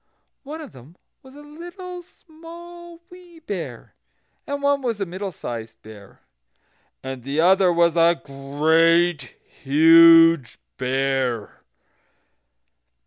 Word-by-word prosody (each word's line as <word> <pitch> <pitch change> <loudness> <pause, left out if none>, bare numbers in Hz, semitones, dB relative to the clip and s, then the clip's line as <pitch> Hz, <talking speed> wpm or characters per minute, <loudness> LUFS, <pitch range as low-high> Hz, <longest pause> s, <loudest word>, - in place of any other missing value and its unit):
One 305 +3 -9
of 300 - -11
them 130 +6 -17 0.3
was 265 +1 -17
a 290 - -13
Little 350 +4 -10
Small 345 0 -15
Wee 355 -2 -16
Bear, 200 - -8 0.5
and 285 0 -5
one 280 0 +1
was 235 -5 -3
a 195 - -2
Middle 190 +2 -7
sized 115 -7 -8
Bear, 105 -2 -15 0.8
and 130 -1 -7
the 140 +5 -4
other 185 +2 +3
was 170 -1 +1
a 170 0 +3
Great 155 +2 0
Huge 165 0 +5 0.2
Bear. 130 -3 -2
170 Hz, 110 wpm, -21 LUFS, -, 0.8 s, Huge